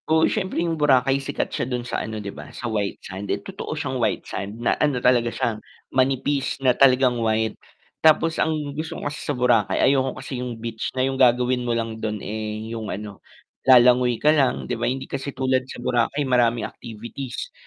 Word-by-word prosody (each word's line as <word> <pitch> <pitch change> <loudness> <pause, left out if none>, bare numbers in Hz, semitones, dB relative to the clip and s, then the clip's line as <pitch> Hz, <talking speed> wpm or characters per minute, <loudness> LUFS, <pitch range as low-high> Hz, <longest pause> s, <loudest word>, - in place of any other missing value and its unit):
Oo, 160 0 +4
siyempre 190 -3 -1
yung 165 -2 -2
Boracay 135 -1 +3
sikat 140 +1 -3
siya - - -1
dun 125 -1 -3
sa - - -2
ano 110 0 -5
'di 100 -2 -6
ba, - - -10
sa - - -8
white 105 -4 -1
sand. 100 +1 -7
Eh, - - +1
totoo - - -6
siyang - - -2
white - - 0
sand 100 +2 -5
na 120 - +1
ano 145 -4 +2
talaga 120 -1 +3
siya, 110 -2 -2 0.3
manipis 135 +1 +1
na 130 -2 +3
talagang 130 -2 +4
white. 110 0 +1 0.5
Tapos 160 +1 +4
ang - - +2 0.2
gusto 155 +3 -5
ko - - -7
kasi 145 +1 -4
sa 145 - -3
Boracay 120 -4 +2
ayoko 135 -1 +2
kasi 130 -2 -5
yung 125 -2 -5
beach 115 0 -4
na 130 - +3
yung 135 0 -1
gagawin 125 0 +4
mo 120 -1 -1
lang 115 -1 -4
dun, 110 -1 -2
eh, 110 +1 -5
yung 110 -2 -5
ano, 105 -1 -6 0.4
lalangoy 125 -1 +5
ka 150 +5 +4
lang 140 -4 +1
'di - - -3
ba, 120 0 -1
hindi 130 +1 -3
kasi 135 +1 -5
tulad 130 0 0
sa - - -7
Boracay 125 +4 0
maraming 120 -2 +2
activities 120 +3 -7
125 Hz, 200 wpm, -23 LUFS, 115-135 Hz, 0.5 s, lalangoy